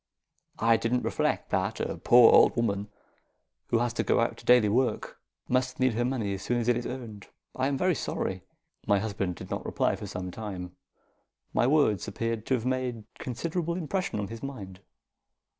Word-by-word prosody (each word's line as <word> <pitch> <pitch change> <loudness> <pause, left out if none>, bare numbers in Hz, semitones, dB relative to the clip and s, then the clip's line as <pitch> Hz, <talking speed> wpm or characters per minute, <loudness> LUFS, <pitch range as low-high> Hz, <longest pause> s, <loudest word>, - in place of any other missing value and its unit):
I 115 0 +4
didn't 120 +2 0
reflect - - -1
that - - 0
a - - -2
poor 120 -1 +7
old - - +6
woman 105 -3 -1 0.8
who 115 - +2
has 120 0 0
to - - -1
go - - +2
out - - +1
to - - -14
daily 125 -3 +6
work 120 +5 0 0.3
must 130 0 0
need 130 -2 +3
her 120 +2 0
money 120 -6 -1
as 95 - -5
soon 120 - -1
as 115 - -2
it 120 - +4
is 120 0 -3
earned. 115 -5 -7 0.3
I 130 +1 0
am 140 -1 0
very 185 +5 +2
sorry." 95 - -3 0.5
My 100 - +4
husband 100 -3 -2
did - - -10
not - - -3
reply - - 0
for - - -7
some 90 0 -5
time. 90 -4 -7 0.8
My 120 - +3
words 135 -10 +2
appeared 115 +1 -3
to 130 - +3
have 120 -1 -4
made 125 -3 -2 0.2
considerable 165 +7 -3
impression 180 - -2
on 100 - -3
his 115 0 -8
mind. 100 -9 -7
120 Hz, 190 wpm, -28 LUFS, 105-130 Hz, 0.8 s, poor